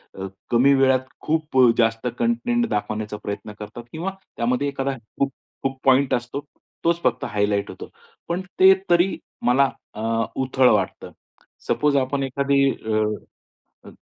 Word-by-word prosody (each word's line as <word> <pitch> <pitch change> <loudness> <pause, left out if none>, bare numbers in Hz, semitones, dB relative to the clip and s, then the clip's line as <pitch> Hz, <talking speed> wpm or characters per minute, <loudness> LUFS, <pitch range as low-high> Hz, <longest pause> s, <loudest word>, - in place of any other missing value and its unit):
अ, 95 0 -5 0.2
कमी 130 +4 +5
वेळात 130 -1 +3 0.2
खूप 155 -3 -1
अ, 125 -2 +7
जास्त 115 -1 +1
कंटेंट 240 0 +1
दाखवण्याचा 105 0 -2
प्रयत्न 100 +1 -5
करतात 105 +3 -8
किंवा 175 +5 -3 0.3
त्यामध्ये 125 +4 0
एखादा 135 -1 -2 0.2
खूप-खूप 135 -1 -4
पॉइंट 135 +1 +4
असतो, 125 +4 -3 0.4
तोच 170 0 +1
फक्त 120 0 +1
हायलाइट 105 -1 0
होतो. - - -9 0.4
पण 175 +2 -1 0.2
ते 190 +1 +9 0.2
तरी 175 +2 +3 0.3
मला 130 +2 +4 0.2
अ, 110 - -7 0.4
उथळ 130 -1 +3
वाटतं. 100 -3 -1 0.6
सपोज 150 -1 +2
आपण 135 +1 0
एखादी 140 +1 +2
अ, 110 -1 -1 0.9
अ, - - -10
130 Hz, 135 wpm, -23 LUFS, 115-145 Hz, 0.9 s, ते